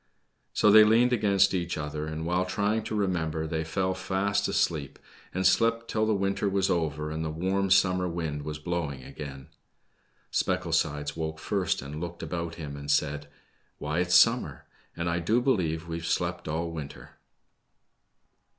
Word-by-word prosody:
So 105 - +4
they 110 +1 +9
leaned 115 +3 +4
against 100 -4 +3
each 85 -3 -2
other, 75 0 -4
and 80 +1 -4
while 90 +2 +1
try 100 +4 0
ing 110 - -2
to 110 - -3
remember, 80 -6 -1
they 80 0 -2
fell 95 +4 -1
fast 100 +2 0
asleep, 75 -5 -1 0.3
and 95 +1 -2
slept 115 +4 +3
till 110 0 0
the 110 - +2
winter 100 +1 0
was 95 0 +1
over 75 -2 -1
and 80 +1 -3
the 80 - -2
warm 95 +5 -1
summer 90 -1 +3
wind 80 -4 -3
was 75 +1 -5
blowing 75 -4 -3
again. 70 -1 -9 0.8
Specklesides 75 0 0
awoke 80 -1 -3
first, 95 -3 -1
and 75 +3 -7
looked 85 0 -6
about 85 -1 -4
him 75 -4 -7
and 70 0 -8
said, 75 0 +1 0.5
Why, 75 +3 -2
it's 90 0 +2
summer, 115 - +4 0.3
and 85 0 -2
I 85 0 0
do 105 +8 +2
believe 85 - 0
we've 85 0 -4
slept 85 - -1
all 85 +2 -2
winter 75 -4 -8
85 Hz, 165 wpm, -28 LUFS, 75-100 Hz, 0.8 s, they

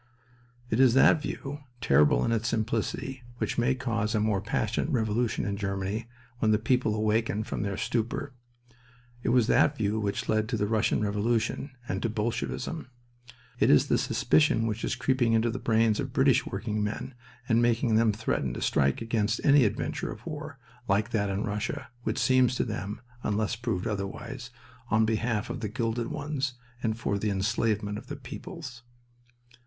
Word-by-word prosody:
It 110 - +1
is 130 -2 +6
that 140 +3 +6
view, 145 -1 -5 0.2
terrible 75 - +4
in - - 0
its 115 0 0
simplicity, 115 +3 -2 0.2
which - - -1
may 130 +2 +2
cause 115 -4 -1
a - - +3
more 105 -2 +1
passionate 110 +5 -1
revolution 115 -3 0
in 100 0 -2
Germany 100 +2 -2 0.3
when 110 - +2
the 105 - +5
people 115 0 +1
awaken 110 0 +1
from - - -4
their 100 -1 -2
stupor. 120 +4 -2 0.9
It - - -1
was 120 -1 +4
that 140 +5 +3
view 105 0 0
which 100 -2 -2
led 110 0 +1
to 120 - 0
the 105 - +1
Russian 110 +1 +1
Revolution 110 +6 0 0.2
and 95 -3 -2
to 115 - 0
Bolshevism. 120 +7 -3 0.7
It - - +4
is 75 - +5
the - - +3
suspicion 150 -7 +3
which 110 0 -2
is - - 0
creeping 125 -2 +1
into 115 +1 +2
the 130 - -4
brains 110 -1 +2
of 135 -3 -3
British 135 -2 +3
working 105 +1 -2
men 110 +5 -4 0.3
and 115 -1 +3
making 120 0 +2
them 110 0 +4
threaten 100 - -2
to - - -5
strike 70 +9 +2
against 115 -2 0
any 140 -3 +6
adventure 105 - -2
of - - -10
war, - - -6 0.3
like 105 +4 +1
that 100 -3 +1
in 100 +1 -1
Russia, 115 +6 -3
which 110 -1 -2
seems 130 -1 +3
to - - +1
them 105 0 -4 0.2
(unless 105 +1 0
proved 115 -6 -2
otherwise) 115 +5 -4 0.4
on 110 0 +4
behalf 110 0 -1
of 130 - -4
the 110 -4 -3
"gilded 115 +1 -1
ones" 145 -2 -3 0.3
and 110 -2 -1
for 100 -3 -1
the 105 - 0
enslavement 105 +1 0
of - - -15
the 145 - -5
peoples. 140 0 -8
115 Hz, 175 wpm, -28 LUFS, 105-125 Hz, 0.9 s, is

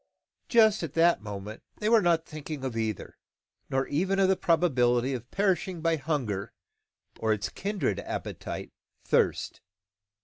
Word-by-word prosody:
Just 220 -3 +5
at 160 -4 -4
that 170 -3 +4
moment 105 +1 -7 0.2
they 210 - -2
were 225 0 +6
not 170 -3 +2
thinking 150 -2 -7
of 130 -3 -3
either, 110 -3 -3 0.5
nor 135 0 +1
even 190 +7 0
of 195 -1 +4
the 190 - +4
probability 130 -8 +2
of 120 -1 -6
perishing 190 -2 0
by 165 0 +2
hunger 130 -10 -2 0.7
or 110 - +1
its 105 -2 -1
kindred 195 - -2
appetite, - - -5 0.3
thirst. - - +1
155 Hz, 140 wpm, -28 LUFS, 120-185 Hz, 0.7 s, were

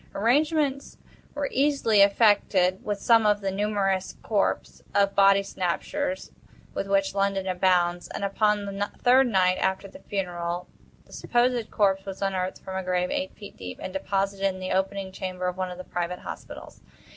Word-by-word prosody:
Arrangements 280 +5 +1 0.4
were 290 -1 -1
easily 270 -7 +3
effected 200 -3 +3
with 205 -1 -2
some 230 +2 +4
of 210 0 +3
the 195 -1 -2
numerous 195 -1 -1
corps 205 -3 -1
of 200 -1 +3
body 195 0 +5
snatchers, 275 +10 -3 0.4
with 195 - -3
which 195 -1 +1
London 195 -1 0
abounds; 180 -1 +1
and, - - -6
upon 205 +1 +1
the 200 +1 -3
third 260 +1 +5
night 185 -4 +2
after 190 +1 -1
the - - -13
funeral, 175 -2 -3 0.4
the - - -18
supposed 240 -1 0
corpse 195 -2 +1
was 195 -1 -7
unearthed 190 -1 -2
from 190 - -7
a - - -1
grave 180 0 0
eight 190 - -3
feet 205 - -11
deep, 90 -1 -8
and 185 - -6
deposited 195 0 -1
in 185 -1 -3
the 185 0 -4
opening 190 0 -1
chamber 185 -1 -5
of 180 - -2
one 185 0 -3
of 180 - -8
the 185 - -7
private 175 0 -3
hospitals. - - -9
195 Hz, 170 wpm, -26 LUFS, 185-210 Hz, 0.4 s, body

